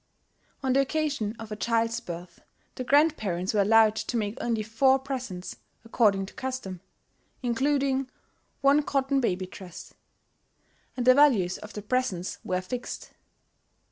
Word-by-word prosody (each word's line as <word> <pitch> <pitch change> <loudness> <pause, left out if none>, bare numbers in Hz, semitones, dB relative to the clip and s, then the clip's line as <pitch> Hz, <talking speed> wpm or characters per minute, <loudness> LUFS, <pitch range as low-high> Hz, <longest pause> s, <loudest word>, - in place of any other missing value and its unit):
On 260 -1 +2
the 270 - +4
occasion 275 -6 -1
of 225 -1 -9
a - - -2
child's 230 +1 0
birth, 175 -4 -9 0.3
the 255 - -5
grandparents 235 - +2
were 210 - +3
allowed 220 +1 +5
to 240 - -2
make 210 -1 -2
only 230 -2 -1
four 260 +5 +3
presents 255 -9 -6 0.3
(according 210 -4 +2
to - - -13
custom), 255 -9 -5 0.6
including 270 +2 +1 0.5
"one 280 +2 +5
cotton 275 -1 0
baby 185 -5 0
dress"; 185 -2 -11 1.0
and 245 - -1
the 255 - +8
values 245 -11 +4
of 210 -1 -10
the 210 - -6
presents 210 -6 -1
were 185 0 -1
fixed. 245 +7 -6
230 Hz, 140 wpm, -27 LUFS, 200-265 Hz, 1.0 s, the